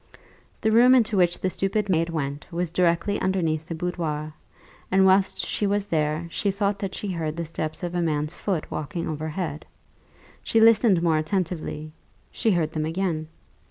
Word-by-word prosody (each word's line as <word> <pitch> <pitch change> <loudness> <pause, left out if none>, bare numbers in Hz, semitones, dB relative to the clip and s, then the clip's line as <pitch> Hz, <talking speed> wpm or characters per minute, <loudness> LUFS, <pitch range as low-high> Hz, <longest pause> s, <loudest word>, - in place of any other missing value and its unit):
The 220 - +2
room 245 +3 +7
into 230 -4 +3
which 175 -2 +3
the 185 - -1
stupid 195 +3 -1
maid 165 -3 +1
went 145 -1 -4
was 175 -1 -2
directly 175 +3 +1
underneath 165 -4 0
the 165 - -4
boudoir; 160 -3 -3 0.6
and 190 0 +4
whilst 190 0 +3
she 205 - -1
was 200 0 0
there 155 -3 0
she 200 - -1
thought 200 0 0
that 195 -2 -4
she 205 - -4
heard 160 -3 -3
the 170 0 -3
steps 155 +2 -4
of 175 0 -3
a 175 - 0
man's 155 -1 -1
foot 185 -5 -3
walking 160 +3 -4
over 155 0 -3
head. 155 -2 -4 0.8
She 225 - +1
listened 220 -5 +5
more 160 -2 +3
attentively 155 -2 -3 0.4
she 225 - 0
heard 170 -5 +1
them 155 -1 -2
again. 165 -2 -2
175 Hz, 175 wpm, -25 LUFS, 155-195 Hz, 0.8 s, room